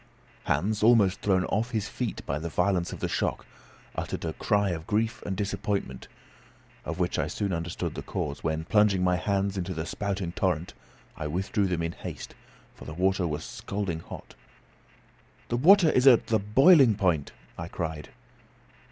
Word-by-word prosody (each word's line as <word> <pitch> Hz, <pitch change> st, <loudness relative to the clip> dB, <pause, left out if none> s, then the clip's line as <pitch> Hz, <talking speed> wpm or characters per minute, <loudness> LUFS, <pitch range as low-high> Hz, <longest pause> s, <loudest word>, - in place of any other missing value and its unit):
Hans, 100 Hz, +8 st, 0 dB
almost 105 Hz, -4 st, +4 dB
thrown 95 Hz, -2 st, +2 dB
off 110 Hz, +4 st, -1 dB
his 110 Hz, -4 st, -2 dB
feet 115 Hz, +1 st, -4 dB
by 70 Hz, +2 st, -2 dB
the 85 Hz, +2 st, -4 dB
violence 90 Hz, 0 st, 0 dB
of -, -, -8 dB
the -, -, 0 dB
shock, -, -, -2 dB, 0.5 s
uttered -, -, -4 dB
a 80 Hz, -, -2 dB
cry 100 Hz, -2 st, +1 dB
of 80 Hz, -1 st, -5 dB
grief 110 Hz, +2 st, 0 dB
and 95 Hz, -2 st, -3 dB
disappointment, 100 Hz, -8 st, -3 dB, 0.8 s
of -, -, -4 dB
which -, -, -1 dB
I -, -, 0 dB
soon 100 Hz, -3 st, -2 dB
under. 85 Hz, +1 st, -3 dB
stood -, -, -4 dB
the -, -, -5 dB
cause, 70 Hz, -1 st, -4 dB
when 80 Hz, 0 st, -1 dB
plunging 105 Hz, -2 st, +3 dB
my 90 Hz, -1 st, +2 dB
hands 100 Hz, +1 st, -1 dB
into 90 Hz, 0 st, -4 dB
the 80 Hz, 0 st, -3 dB
spouting 95 Hz, +1 st, -3 dB
torrent, 90 Hz, -2 st, -1 dB, 0.4 s
I 75 Hz, -, -4 dB
withdrew 95 Hz, +5 st, 0 dB
them 90 Hz, -2 st, -1 dB
in 85 Hz, -, -2 dB
haste, -, -, -8 dB, 0.4 s
for -, -, -13 dB
the 75 Hz, -, -7 dB
water 95 Hz, 0 st, +1 dB
was 75 Hz, -1 st, -3 dB
scalding 100 Hz, -5 st, -4 dB
hot. -, -, -10 dB, 1.2 s
"The 120 Hz, -, 0 dB
water 175 Hz, +4 st, +6 dB
is 130 Hz, +1 st, +3 dB
at 125 Hz, -4 st, +7 dB
the 110 Hz, -1 st, +1 dB
boiling 130 Hz, -, +6 dB
point," 90 Hz, -8 st, 0 dB, 0.2 s
I -, -, -6 dB
cried. 80 Hz, -2 st, -5 dB
95 Hz, 175 wpm, -27 LUFS, 85-105 Hz, 1.2 s, at